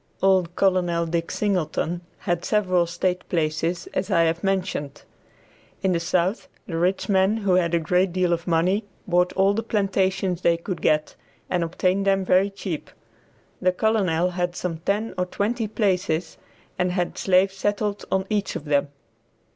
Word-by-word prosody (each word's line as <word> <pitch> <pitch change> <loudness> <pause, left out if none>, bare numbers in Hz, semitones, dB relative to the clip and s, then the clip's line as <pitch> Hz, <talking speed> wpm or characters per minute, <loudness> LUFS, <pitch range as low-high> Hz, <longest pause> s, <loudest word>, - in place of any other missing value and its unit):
Old 185 -3 +3
Col. 190 -2 +3 0.2
Dick 165 0 -2
Singleton 175 -3 -1 0.2
had 175 -2 -1
several 185 -5 +2
state 180 +2 -2
places 165 +1 -1
as 185 +2 -2
I 170 -4 +4
have 165 +2 0
mentioned. 185 -7 -2 0.8
In 190 - +2
the 170 - +1
South, 175 +4 0 0.2
the 165 - -5
rich 180 +3 0
men 195 +2 +3
who 200 -4 +1
had 175 -2 +2
a - - +3
great 180 +3 +1
deal 180 -1 +1
of 170 +1 -3
money 180 +5 +2 0.2
bought 180 0 +2
all 195 +1 +3
the 220 - -1
plantations 190 -4 0
they 170 -1 +3
could 175 +1 -5
get 155 0 +1 0.4
and 180 -2 +1
obtained 185 +3 0
them 195 -1 +2
very 185 +2 +4
cheap. 195 -5 -5 0.7
The 185 - +3
Colonel 180 -5 +1
had 175 0 -2
some 170 -3 -3
ten 205 +6 -1
or 180 - 0
twenty 220 +4 -1
places 185 -6 -1 0.4
and 180 0 +1
had 180 -2 -1
slaves 190 +1 +3
settled 205 +1 -1
on 190 0 +1
each 205 -2 -1
of 165 -3 -5
them. 145 -1 +2
185 Hz, 165 wpm, -24 LUFS, 170-195 Hz, 0.8 s, I